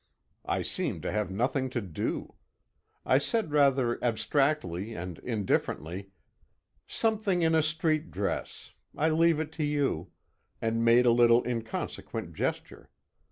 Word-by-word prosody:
I - - 0
seemed - - -2
to - - -2
have 105 -3 -1
nothing 130 +6 0
to 125 - -2
do. 95 -8 -4 0.7
I 130 - +4
said 210 +3 -1
rather 135 -5 +3
abstractedly 115 - 0
and 90 -2 -6
indifferently 100 - -2 0.8
"Something 215 -5 0
in 160 0 +3
a 160 - +5
street 155 0 0
dress. 100 +1 -4 0.3
I 155 +2 +2
leave 165 0 +3
it 155 -1 -3
to 160 -1 -3
you," 140 - 0 0.5
and 115 +1 0
made 120 +2 +5
a 120 - +6
little 120 0 +5
inconsequent 115 -2 -4
gesture. - - -4
125 Hz, 130 wpm, -29 LUFS, 110-155 Hz, 0.8 s, a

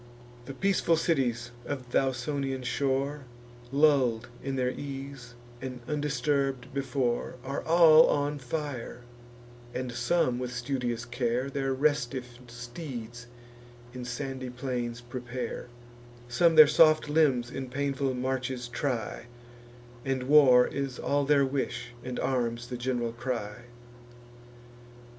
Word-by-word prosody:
The 135 - -8
peaceful 185 -2 +2
cities 125 -7 0
of 130 -3 -6
th' - - -4
Ausonian 135 0 0
shore, 135 +3 -1 0.5
Lull'd 135 -6 +3
in 135 0 -3
their 125 -1 +1
ease, 135 -3 -7 0.3
and 130 -1 -5
undisturb'd 140 -3 -1
before, 130 -3 -1
Are 135 +2 -3
all 160 -1 +7
on 145 0 0
fire; 130 -3 -5 0.7
and 125 -1 -3
some, 125 +1 +1
with 125 -1 -3
studious 120 -2 -2
care, 125 +2 -1
Their 135 -1 -1
restiff 130 -4 -1
steeds 120 -1 -8 0.7
in 125 -1 -6
sandy 130 +1 -4
plains 125 -2 -4
prepare; 125 0 -5 0.6
Some 165 +7 +3
their 155 -1 +11
soft 155 +1 +5
limbs 140 -6 +2
in 130 -1 -5
painful 135 0 -1
marches 130 -1 -2
try, 120 -3 -3 0.8
And 135 -1 -1
war 130 -3 +7
is 135 -2 -3
all 145 0 0
their 140 -1 +4
wish, 130 -3 -3
and 125 -1 -4
arms 120 -2 -1
the 125 - -4
gen'ral 120 -1 -1
cry. 120 -2 -4
130 Hz, 115 wpm, -29 LUFS, 120-140 Hz, 0.8 s, their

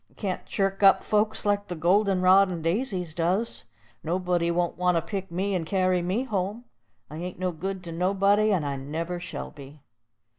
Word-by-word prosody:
I - - -28
can't 190 -4 -3
chirk 195 0 -1
up 195 -1 +6
folks 215 +1 +1
like 205 0 +1
the 180 - -4
golden 185 +3 +2
rod 190 +1 +6
and 170 -3 -5
daisies 180 -2 -1
does. 180 - -1 0.4
Nobody 175 0 0
won't 175 0 0
want 180 -1 +2
to - - +1
pick 195 0 -5
me 190 +4 -1
and 180 -3 0
carry 185 +1 +1
me 185 +8 -1
home. 210 0 -3 0.5
I 155 - -7
ain't 180 +2 -6
no 185 0 -1
good 185 +3 -5
to 170 - -7
anybody, 200 +5 +2
and 175 -7 +1
I 140 -1 -2
never 165 +6 -4
shall - - -6
be." 140 +1 -13
185 Hz, 190 wpm, -26 LUFS, 170-195 Hz, 0.5 s, up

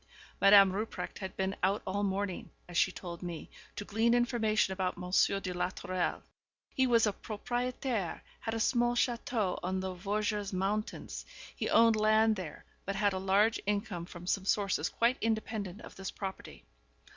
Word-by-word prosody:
Madame 195 -1 +8
Rupprecht 215 +3 -4
had 190 -1 -6
been 190 0 -1
out 195 +3 +1
all 200 +2 -1
morning, 195 -1 -2 0.2
as 175 - -10
she 190 - +4
told 175 -2 -8
me, 175 -3 -6 0.2
to 205 - -5
glean 225 +3 +2
information 225 -5 +2
about 185 -1 -2
Monsieur 185 +2 +2
de 185 -2 -4
la 180 0 0
Tourelle. 185 -1 -2 0.5
He 260 -1 +3
was 230 -2 +4
a 210 - +1
propriétaire, 240 -2 -3 0.2
had 225 0 -3
a - - -1
small 240 +1 +2
château 235 -5 0
on 185 +1 -1
the 190 0 -3
Vosges 205 +2 -2
mountains; 200 +3 -2 0.3
he - - -2
owned 230 -1 +6
land 215 +1 +4
there, 180 -7 -7 0.2
but 195 - -3
had 205 0 +2
a 190 - -2
large 200 +4 +3
income 200 -4 -2
from 175 -1 -10
some 190 +1 0
sources 195 -6 +1
quite 235 +3 +2
independent 220 -3 -2
of - - -11
this 195 -1 -5
property. 190 - -7
200 Hz, 170 wpm, -32 LUFS, 190-220 Hz, 0.5 s, Madame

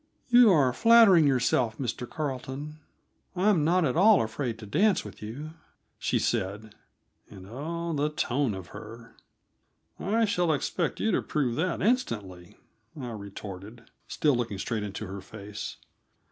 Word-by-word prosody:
"You 240 -3 +7
are 135 -7 +3
flattering 200 - +6
yourself, 125 -3 +1
Mr. 125 -1 -4
Carleton; 145 +1 -5 0.6
I 190 +4 +2
am 170 -7 +2
not 175 +2 +3
at 130 - 0
all 200 - +6
afraid 115 +1 -4
to 110 - -10
dance 195 - +2
with - - -11
you," 130 +9 -7 0.5
she - - 0
said 105 +3 -2 0.6
and, 95 -3 -12
oh, 165 +8 -4
the 150 0 0
tone 135 -5 -1
of 90 -2 -9
her! 115 +2 -11 0.8
"I 225 +4 +1
shall 175 -5 +1
expect 165 +3 -2
you 220 - +1
to - - +1
prove 135 -6 -1
that 170 +2 -1
instantly," 105 - -2 0.4
I 125 -3 -5
retorted, 100 +1 -9 0.2
still 145 -3 +1
looking 115 -4 -2
straight 110 +3 -3
into 105 +1 -5
her 95 0 -7
face. 105 +1 -8
130 Hz, 145 wpm, -27 LUFS, 110-170 Hz, 0.8 s, You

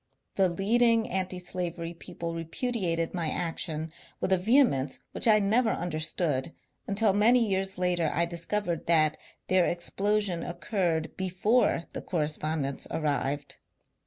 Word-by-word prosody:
The 190 -2 +3
leading 225 +5 +2
antislavery 180 -2 -3
people 170 0 -6
repudiated 165 0 -2
my 170 -4 -1
action 160 -2 -3 0.3
with 190 - +1
a - - +4
vehemence 190 - +3
which - - +1
I 215 -1 +7
never 220 +4 +2
understood 155 -4 -1 0.3
until 200 0 +2
many 230 +3 +4
years 190 -1 0
later 175 -3 +1
I 170 - +2
discovered 170 +1 -2
that 155 -2 +4 0.3
their 185 -2 +3
ex 175 0 0
plosion 205 -4 0
occurred 170 -4 -2
before 190 +2 +1
the - - -4
correspondence 155 -3 -2
arrived. 145 -2 -2
175 Hz, 125 wpm, -28 LUFS, 165-205 Hz, 0.3 s, I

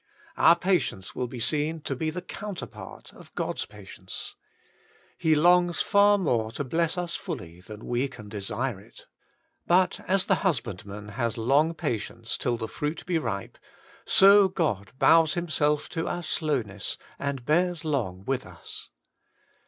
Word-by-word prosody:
Our 165 - +6
patience 170 - 0
will 125 - -2
be 120 0 -8
seen 155 +5 0
to 140 - -3
be 155 +5 -1
the 175 +3 -5
counterpart 205 -3 -8
of - - -16
God's - - -2
patience. - - -9 0.8
He 160 -3 +2
longs 175 +2 +4
far 205 0 +5
more 120 - +1
to 145 - -3
bless 165 +5 0
us 175 -1 -3
fully 90 - -6
than 105 +3 -10
we 125 +3 0
can 110 -6 -11
desire 105 +3 -3
it 100 - -16 0.6
But, 180 +1 +3
as 190 +1 +2
the - - +2
husbandman 105 - -2
has 115 0 -2
long 140 +8 +3
patienct; 115 -7 -3
till 120 -1 0
the 115 -1 -4
fruit 150 +6 -4
be 175 -2 +1
ripe, 100 -9 -4 0.4
so 200 0 +7
God 145 - -1
bows 160 +1 +5
Himself 150 -3 0
to 165 - -3
our 175 - -3
slowness 125 - -2 0.2
and 140 -3 -3
bears 170 +2 +1
long 100 -11 -2
with 135 -1 -1
us. 90 -2 -9
150 Hz, 150 wpm, -27 LUFS, 115-170 Hz, 0.8 s, so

